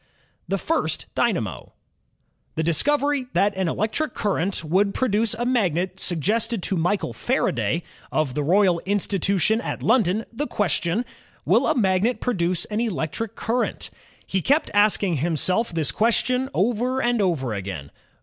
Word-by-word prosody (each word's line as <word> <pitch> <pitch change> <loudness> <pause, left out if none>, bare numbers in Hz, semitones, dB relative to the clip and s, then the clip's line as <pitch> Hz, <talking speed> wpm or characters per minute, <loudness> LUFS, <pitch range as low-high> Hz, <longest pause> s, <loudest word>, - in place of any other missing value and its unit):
The 195 - 0
First 325 - -1
Dynamo - - -1 0.8
The 160 - 0
discovery 280 - +1
that 200 +1 +2
an 190 -1 0
electric 220 - -1
current 195 -3 -1
would 195 +5 +1
produce 225 -3 +1
a 240 - -2
magnet 190 -7 0
suggested 215 +5 -1
to 195 - 0
Michael 175 - 0
Faraday, - - 0 0.3
of 155 -5 0
the 150 - -1
Royal 180 +3 +3
Institution 200 +2 +1
at - - -5
London, 220 -2 +2
the 290 +6 -3
question, 190 +3 0 0.4
Will - - +3
a 315 - +1
magnet 200 +3 +2
pro 250 - -1
duce 175 -2 0
an 215 +1 -2
electric 220 0 -3
current? 240 +2 -2 0.3
He 190 - -1
kept 285 - +2
asking 205 -4 +3
himself 175 - 0
this 160 -3 0
question 250 +3 +1
over 245 +5 +1
and 240 -3 +1
over 150 - 0
again. 95 -8 -6
200 Hz, 140 wpm, -23 LUFS, 175-235 Hz, 0.8 s, Royal